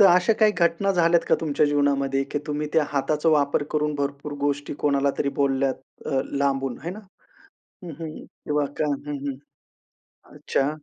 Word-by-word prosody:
तर 200 Hz, -, +9 dB
अशा 180 Hz, +3 st, +5 dB
काही 215 Hz, -1 st, +6 dB
घटना 170 Hz, +3 st, +2 dB
झाल्यात 170 Hz, -1 st, +4 dB
का -, -, +5 dB
तुमच्या 150 Hz, -1 st, +2 dB
जीवनामध्ये, 140 Hz, -2 st, +1 dB
की 140 Hz, -, -3 dB
तुम्ही 150 Hz, 0 st, -2 dB
त्या 160 Hz, -, +4 dB
हाताचा 150 Hz, +3 st, +1 dB
वापर 145 Hz, -2 st, +3 dB
करून 150 Hz, 0 st, 0 dB
भरपूर 140 Hz, +1 st, -3 dB
गोष्टी 145 Hz, 0 st, -1 dB
कोणाला 140 Hz, -1 st, +2 dB
तरी 140 Hz, -, +1 dB
बोलल्यात 135 Hz, -1 st, +2 dB, 0.3 s
अ, 135 Hz, -, +1 dB, 0.2 s
लांबून, 135 Hz, -2 st, 0 dB
हे 170 Hz, -, -2 dB
ना? 200 Hz, +4 st, -8 dB, 0.8 s
हं, 175 Hz, -, -6 dB
हं. 155 Hz, -1 st, -7 dB
वाह! 150 Hz, -1 st, +2 dB
का -, -, +1 dB
हं, 145 Hz, +1 st, -4 dB
हं. 140 Hz, -2 st, -2 dB, 1.0 s
अच्छा. 135 Hz, +1 st, 0 dB
145 Hz, 165 wpm, -24 LUFS, 140-160 Hz, 1.0 s, तर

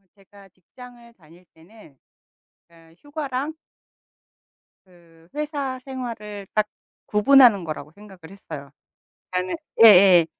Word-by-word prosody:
제가 200 Hz, 0 st, -20 dB
직장을 235 Hz, +6 st, -17 dB
다닐 170 Hz, -1 st, -21 dB
때는 165 Hz, -4 st, -19 dB, 0.7 s
그니까 165 Hz, -1 st, -22 dB
휴가랑 290 Hz, 0 st, -5 dB, 1.3 s
그 170 Hz, -2 st, -23 dB
회사 290 Hz, -3 st, -4 dB
생활을 225 Hz, -6 st, -8 dB
딱 215 Hz, -1 st, +1 dB, 0.4 s
구분하는 215 Hz, -2 st, +5 dB
거라고 155 Hz, -2 st, -7 dB
생각을 200 Hz, 0 st, -16 dB
했어요. 145 Hz, -8 st, -10 dB, 0.6 s
그러니까는 180 Hz, 0 st, -3 dB, 0.3 s
예예. 185 Hz, -5 st, +7 dB
200 Hz, 245 characters per minute, -22 LUFS, 175-250 Hz, 1.3 s, 예예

